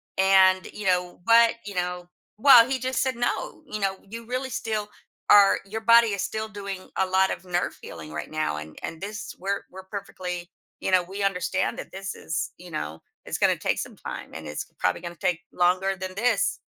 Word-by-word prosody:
And 190 -1 +5
you 210 - -7
know, 180 -1 +1
what, 230 +1 +6
you 205 - -6
know, 180 0 -3 0.3
well, 245 0 +8
he 270 - +1
just 260 +1 -1
said, 260 -2 0
"No, 240 0 -2
you 215 - -5
know, 195 -1 -1
you 230 +3 -7
really 255 +2 -3
still 215 -2 -3 0.4
or 200 -1 +7
your 220 +3 -5
body 230 -1 +6
is 200 - -2
still 220 0 -3
doing 200 -3 -7
a 190 - +3
lot 190 +1 +3
of - - -5
nerve 180 0 -1
healing 75 -2 -9
right 75 - -5
now 155 - -1
and 75 0 -9
and 160 +1 -6
this 205 +1 -6
we're 200 +2 -2
we're 190 +1 -9
perfectly, 180 -3 -6 0.3
you 190 - -1
know, 185 -1 +5
we 195 +3 -5
understand 190 0 0
that - - -8
this 195 0 -5
is, 165 - -3
you 180 0 -12
know, 80 - -5 0.2
it's - - -3
gonna - - +3
take - - 0
some - - -5
time - - -7
and 80 -1 -7
it's 75 - -4
probably - - +1
going 175 -1 -6
to - - -35
take 175 -2 +1
longer 185 +2 +2
than 185 0 -6
this, 245 - +1
190 Hz, 210 wpm, -26 LUFS, 180-215 Hz, 0.4 s, well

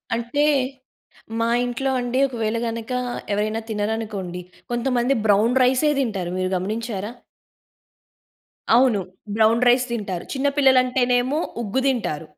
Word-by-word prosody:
అంటే 240 +6 0 0.9
మా 230 - +1 0.2
ఇంట్లో 265 +2 -2
అండి 245 +1 -1
ఒకవేళ 230 -3 -2
గనక 230 +2 -5 0.4
ఎవరైనా 215 +2 -1
తినరనుకోండి 210 -4 -3 0.3
కొంతమంది 245 +1 +1
బ్రౌన్ 210 +4 +4
రైసే 260 +4 +3
తింటారు. 195 -9 -2
మీరు 185 0 0
గమనించారా? 215 +2 -4 1.6
అవును. 245 -4 +4 0.4
బ్రౌన్ 225 +2 +3
రైస్ 250 +1 +4
తింటారు 200 -6 -4
చిన్న 275 +1 0
పిల్లలంటేనేమో 255 0 +3 0.2
ఉగ్గు 245 +6 -1
తింటారు. 160 - -1
230 Hz, 105 wpm, -22 LUFS, 210-255 Hz, 1.6 s, బ్రౌన్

